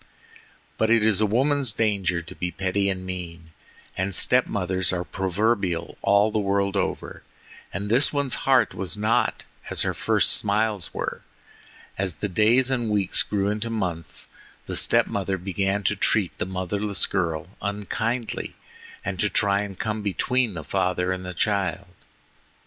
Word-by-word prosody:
But 110 - +3
it 115 -2 +4
is 110 -2 +3
a 105 - +4
woman's 135 +3 +2
danger 100 -6 0
to 80 - -10
be 90 - -3
petty 95 +2 0
and 95 -1 -3
mean, 85 -3 -7 0.4
and 95 0 -1
step 125 +5 +4
mothers 95 -2 -1
are 90 -1 -1
proverbial 95 -1 -1
all 100 +2 +4
the 110 - +1
world 100 0 +1
over, 100 - -2 0.5
and 100 +2 -4
this 125 +7 +4
one's 140 -3 0 0.2
heart 130 -6 +5
was 95 +2 -2
not 110 +2 +1 0.3
as - - +1
her - - 0
first - - +2
smiles 105 -2 0
were. - - -4 0.8
As 95 -3 0
the 105 - -3
days 115 +7 +3
and 120 -4 0
weeks 100 -3 +2
grew 100 -1 0
into 105 +2 -2
months, 90 -8 -3 0.4
the - - -4
step - - +4
mother 95 -1 -2
began 95 +2 -1
to 105 - +1
treat 100 -1 +1
the 90 - -1
motherless 95 +2 0
girl 85 -4 -2
unkindly 110 +4 -3 0.5
and 95 -1 -3
to 105 - +2
try 100 +1 +2
and 100 -2 -6
come 110 -1 -2
between 110 +2 0
the 80 - -5
father 90 +1 0
and 90 0 -4
child. 100 -3 0
100 Hz, 155 wpm, -25 LUFS, 95-110 Hz, 0.8 s, heart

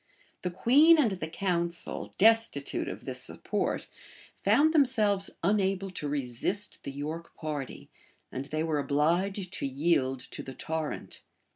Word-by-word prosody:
The 180 - -2
queen 275 - +6
and 260 -9 +3
the 180 -5 -4
council, 170 0 -2
destitute 225 +2 +3
of - - -7
this - - -3
support, - - -2 0.6
found 315 +2 +4
themselves 215 -9 +3
unable 195 0 +1
to 150 -4 -4
resist 145 - -1
the 140 - -6
York 155 +4 -6
party; 150 -4 -5 0.4
and 130 +1 -4
they 155 +2 -2
were 155 -2 0
obliged 175 +7 0
to - - -2
yield 135 -2 +1
to - - -7
the 130 - -9
torrent. 160 +2 -4
170 Hz, 135 wpm, -29 LUFS, 150-200 Hz, 0.6 s, queen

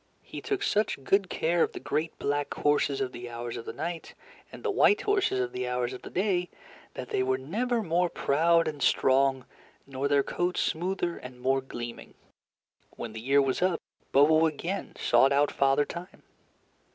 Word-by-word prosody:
He - - -8
took 405 -1 -2
such 210 - 0
good 195 +5 +2
care 170 +1 +1
of - - +2
the - - -6
great 155 +3 -2
black 145 0 -1
horses 145 -2 +1
of 130 -1 -1
the 120 0 -8
Hours 120 0 -5
of 115 - -7
the - - -4
Night, 170 0 -5 0.4
and - - -11
the 450 - 0
white 410 +1 +4
horses 405 - +1
of 125 -1 -1
the 125 0 -3
Hours 125 0 -1
of 130 - -8
the - - -9
Day, 180 -2 0 0.5
that 125 - -6
they - - 0
were 130 0 +1
never 225 - -1
more 175 0 +1
proud 165 +4 +2
and 150 -2 -4
strong, 135 -1 +3 0.4
nor 135 0 -2
their 140 -1 +3
coats 175 +4 -1
smoother 175 +1 -1
and 125 -1 -10
more 135 +1 +1
gleaming. 120 -2 -8 0.8
When 115 - -6
the 110 - -7
year 140 +3 +3
was 135 +3 -1
up, 180 -2 +2 0.3
Bobo 155 +3 +5
again 170 +6 -4
sought 120 +3 +4
out 145 +1 +3
Father 140 +1 +2
Time. 175 +2 -9
145 Hz, 185 wpm, -28 LUFS, 130-175 Hz, 0.8 s, Bobo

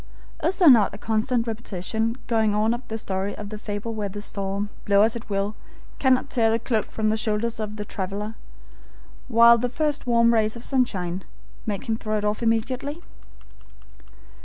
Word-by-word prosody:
Is 340 +5 +1
there 360 - +5
not 225 -7 +6
a - - -8
constant 225 +3 0
repetition 225 +1 -2
going 220 -3 +1
on 215 +2 +2
of 240 - -4
the 220 - -4
story 195 -1 -3
of 205 -1 -7
the 215 0 -7
fable 210 +2 -4
where 210 -2 -3
the 205 +2 -7
storm, 200 0 -3
blow 200 0 +4
as 225 +1 +3
it 235 -1 -8
will, 200 +1 -1 0.4
cannot 260 0 +2
tear 225 -3 +3
the 225 - +2
cloak 230 -1 -1
from 215 -1 -1
the 220 - 0
shoulders 220 +1 -1
of 215 -1 -4
the 210 -1 -5
traveler, 200 +3 -4 0.9
while 235 0 +7
the 245 +2 -1
first 295 0 -1
warm 235 -1 +4
rays 220 -1 +2
of 235 - -8
sunshine 190 -9 0 0.4
make 205 -3 -3
him 220 -1 0
throw 215 -1 -2
it 210 - -2
off 210 +2 -1
immediately? 250 +7 -1
220 Hz, 185 wpm, -24 LUFS, 205-235 Hz, 0.9 s, while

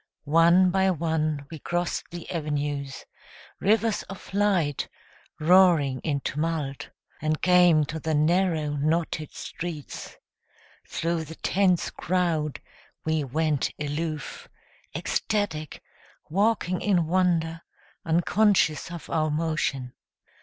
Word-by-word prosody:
One 170 +4 +5
by 190 0 +3
one 155 -4 -1
we 160 - -7
crossed 175 +4 -2
the 175 -1 -8
avenues, 145 -4 -3 0.5
Rivers 220 +1 +2
of 195 0 -10
light, 190 -8 +1 0.5
roaring 160 -6 +5
in 140 -1 -2
tumult, 150 -2 -3 0.3
And 155 0 0
came 180 -4 +5
to 160 +2 -5
the 160 0 -1
narrow, 155 -1 +2
knotted 155 +1 -1
streets. 160 -4 -7 0.7
Thru 165 0 -1
the 160 +1 -9
tense 185 -1 +1
crowd 160 -7 -1 0.4
We 160 -1 +1
went 150 +1 0
aloof, 150 +1 -4 0.5
ecstatic, 190 -8 -2 0.5
walking 195 -2 +1
in 180 -5 +2
wonder, 165 -2 +1 0.4
Unconscious 175 -1 +2
of 170 -1 -8
our 155 -1 0
motion. 150 -5 -1
160 Hz, 105 wpm, -26 LUFS, 150-180 Hz, 0.7 s, One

